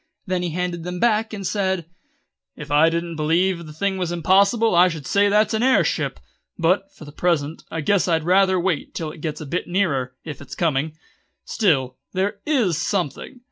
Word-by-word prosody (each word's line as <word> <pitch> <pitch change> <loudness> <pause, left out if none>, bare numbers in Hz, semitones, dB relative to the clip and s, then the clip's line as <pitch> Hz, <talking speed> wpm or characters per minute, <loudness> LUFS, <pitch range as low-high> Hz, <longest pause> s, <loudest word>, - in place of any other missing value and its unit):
Then 185 -2 -1
he 175 - -2
handed 175 0 -3
them 180 +1 -5
back, 220 0 +2
and 200 -3 -6
said: 190 -4 -1 0.7
"If 150 -1 -9
I 150 +3 +5
didn't 170 0 -3
believe 170 +2 +1
the - - -9
thing 190 +5 -2
was 175 -2 -2
impossible 195 +6 +3
I 175 +1 +6
should 160 -5 -5
say 200 +5 +3
that's 210 +2 +3
an 220 - 0
air 260 +1 +4
ship; - - -2 0.4
but, 185 +3 +1
for 155 - -13
the 145 - -10
present, 160 -1 -1
I 160 - -3
guess 200 +5 +2
I'd 165 -2 +1
rather 190 +2 +3
wait 175 -4 -2
till 160 -2 -3
it 155 - -13
gets 155 -1 -4
a - - -6
bit 170 +6 -3
nearer, 140 -9 0
if 150 -3 -7
it's 140 - -9
coming. 155 -1 -1 0.5
Still, 135 - +1 0.2
there 200 +2 -1
is 225 - +2
something. 200 - -3
175 Hz, 195 wpm, -22 LUFS, 155-195 Hz, 0.7 s, I